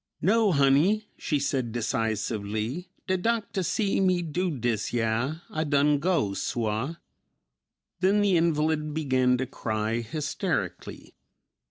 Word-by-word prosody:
"No, 210 Hz, +3 st, +4 dB
honey," 150 Hz, +9 st, +3 dB
she 150 Hz, -, -1 dB
said 135 Hz, -4 st, -1 dB
decisively, 110 Hz, -, -2 dB, 0.2 s
"de 185 Hz, -, +1 dB
doctah 215 Hz, -2 st, -1 dB
see 200 Hz, +3 st, 0 dB
me 185 Hz, -2 st, +2 dB
do 180 Hz, +3 st, -1 dB
dis 120 Hz, -7 st, -1 dB
yah, 115 Hz, +5 st, 0 dB, 0.2 s
I 155 Hz, -, -1 dB
done 145 Hz, -1 st, +3 dB
go, 155 Hz, -, +1 dB
suah." 115 Hz, +8 st, -2 dB, 1.0 s
Then 195 Hz, +3 st, +3 dB
the 200 Hz, -3 st, +3 dB
invalid 155 Hz, -2 st, +1 dB
began 130 Hz, -4 st, +2 dB
to 130 Hz, -, -1 dB
cry 110 Hz, -3 st, -2 dB
hysterically. 140 Hz, +6 st, -3 dB
145 Hz, 120 wpm, -27 LUFS, 115-180 Hz, 1.0 s, No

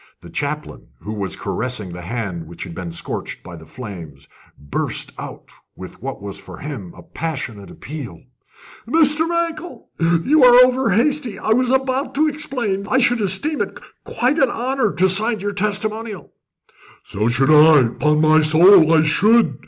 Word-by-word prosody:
The 85 Hz, -, -13 dB
chaplain, 150 Hz, -, -5 dB
who 105 Hz, -, -6 dB
was 100 Hz, -3 st, -4 dB
caressing 105 Hz, +1 st, -4 dB
the 90 Hz, 0 st, -8 dB
hand 90 Hz, -4 st, -5 dB
which 85 Hz, -, -9 dB
had 85 Hz, -, -9 dB
been 85 Hz, -1 st, -7 dB
scorched 85 Hz, -, -6 dB
by 85 Hz, -1 st, -10 dB
the 80 Hz, -1 st, -14 dB
flames, 85 Hz, -, -10 dB, 0.3 s
burst 70 Hz, 0 st, -4 dB
out -, -, -10 dB, 0.2 s
with -, -, -11 dB
what -, -, -7 dB
was 100 Hz, -1 st, -7 dB
for -, -, -12 dB
him 130 Hz, -, -7 dB
a -, -, -13 dB
passionate 130 Hz, -11 st, -6 dB
appeal: 135 Hz, -, -9 dB, 0.6 s
"Mr. 315 Hz, +3 st, +2 dB
Mankell, 335 Hz, 0 st, -4 dB, 0.4 s
you 300 Hz, +1 st, +4 dB
are 250 Hz, 0 st, +8 dB
over 255 Hz, +1 st, 0 dB
hasty. 245 Hz, +2 st, 0 dB
I -, -, -3 dB
was 250 Hz, +2 st, +2 dB
about 265 Hz, +1 st, -1 dB
to 310 Hz, +2 st, +2 dB
explain 260 Hz, -10 st, -3 dB
that 200 Hz, -, -10 dB
I -, -, +4 dB
should 245 Hz, -2 st, +2 dB
esteem 210 Hz, -, +1 dB
it -, -, -5 dB, 0.2 s
quite 260 Hz, +6 st, -1 dB
an 265 Hz, -3 st, +3 dB
honour 245 Hz, -2 st, -1 dB
to 185 Hz, +2 st, +2 dB
sign 215 Hz, +4 st, +3 dB
your 205 Hz, +1 st, -4 dB
testimonial." 210 Hz, -1 st, -3 dB, 0.7 s
"So 105 Hz, +3 st, -3 dB
should 130 Hz, +5 st, +2 dB
I 155 Hz, -1 st, +7 dB
upon 150 Hz, +6 st, 0 dB
my 155 Hz, 0 st, +4 dB
soul, 160 Hz, +2 st, +6 dB
I 160 Hz, -1 st, +4 dB
should!" 215 Hz, +9 st, +3 dB
185 Hz, 170 wpm, -19 LUFS, -, 0.7 s, are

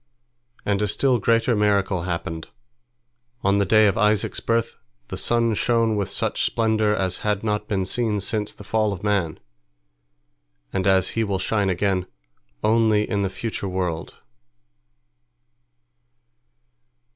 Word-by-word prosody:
And 100 Hz, 0 st, +1 dB
a 105 Hz, -, +1 dB
still 125 Hz, +4 st, +2 dB
greater 115 Hz, +3 st, +2 dB
miracle 100 Hz, -3 st, +1 dB
happened: 80 Hz, -1 st, -4 dB, 1.0 s
on 100 Hz, +1 st, +3 dB
the 100 Hz, -, +1 dB
day 110 Hz, +1 st, +5 dB
of 105 Hz, +2 st, +2 dB
Isaac's 105 Hz, -2 st, +1 dB
birth 115 Hz, 0 st, -1 dB, 0.3 s
the -, -, -4 dB
sun 115 Hz, -1 st, +1 dB
shone 115 Hz, 0 st, +1 dB
with 100 Hz, -2 st, -1 dB
such 100 Hz, -, -1 dB
splendor 110 Hz, -2 st, +1 dB
as 95 Hz, -3 st, -1 dB
had 105 Hz, -1 st, -1 dB
not 105 Hz, -1 st, -1 dB
been 95 Hz, -2 st, -1 dB
seen 110 Hz, 0 st, 0 dB
since 105 Hz, +2 st, -1 dB
the -, -, -12 dB
fall 110 Hz, 0 st, 0 dB
of 95 Hz, 0 st, -9 dB
man, 95 Hz, -6 st, 0 dB, 1.3 s
and 95 Hz, 0 st, 0 dB
as 95 Hz, -1 st, +4 dB
he 115 Hz, -, -1 dB
will 100 Hz, -3 st, -1 dB
shine 100 Hz, +1 st, 0 dB
again 95 Hz, 0 st, 0 dB, 0.6 s
only 110 Hz, -1 st, +3 dB
in 100 Hz, -2 st, -1 dB
the 95 Hz, -, 0 dB
future 105 Hz, +1 st, -4 dB
world. 90 Hz, -3 st, -3 dB
105 Hz, 135 wpm, -23 LUFS, 95-110 Hz, 1.3 s, day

